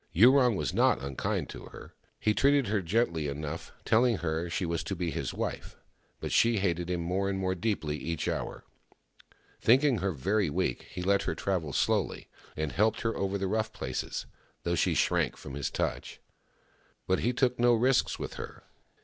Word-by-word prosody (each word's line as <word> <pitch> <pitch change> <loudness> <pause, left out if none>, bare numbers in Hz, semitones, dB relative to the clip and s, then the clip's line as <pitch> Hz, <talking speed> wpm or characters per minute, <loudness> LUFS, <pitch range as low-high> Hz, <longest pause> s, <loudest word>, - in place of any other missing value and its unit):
Yurong 125 +4 +6
was 75 -7 -2
not - - +3
unkind 70 0 -2
to - - -9
her. - - -12 0.3
He 105 - +2
treated 140 -1 +3
her 105 -1 +1
gently 85 -4 0
enough, 75 +3 -5
telling 120 0 +4
her 80 0 -2
she 90 +2 -1
was 85 -1 -1
to 95 - -2
be 85 -2 -2
his - - -3
wife, - - -4 0.4
but - - -4
she 115 -1 +4
hated 90 -3 0
him 90 -1 -1
more 95 +3 0
and 95 - -1
more 95 -1 0
deeply 90 -6 -1
each 80 +3 -3
hour. - - -3 1.0
Thinking 130 0 +4
her 95 +1 0
very 95 +5 0
weak, 75 - -1
he 90 - -5
let 100 +2 +3
her - - -1
travel 90 -7 -1
slowly, - - 0 0.3
and 80 -1 -1
helped 110 +4 +2
her 115 0 -1
over 100 0 -1
the 95 - -2
rough 110 +3 0
places, - - -4 0.4
though 85 - 0
she 85 - +2
shrank - - +1
from 65 - -9
his 70 0 -2
touch. - - -3 0.9
But 95 - +1
he 120 - +1
took 125 -1 +1
no 120 0 +5
risks 125 +3 +2
with - - -5
her. - - -8
95 Hz, 185 wpm, -29 LUFS, 85-110 Hz, 1.0 s, Yurong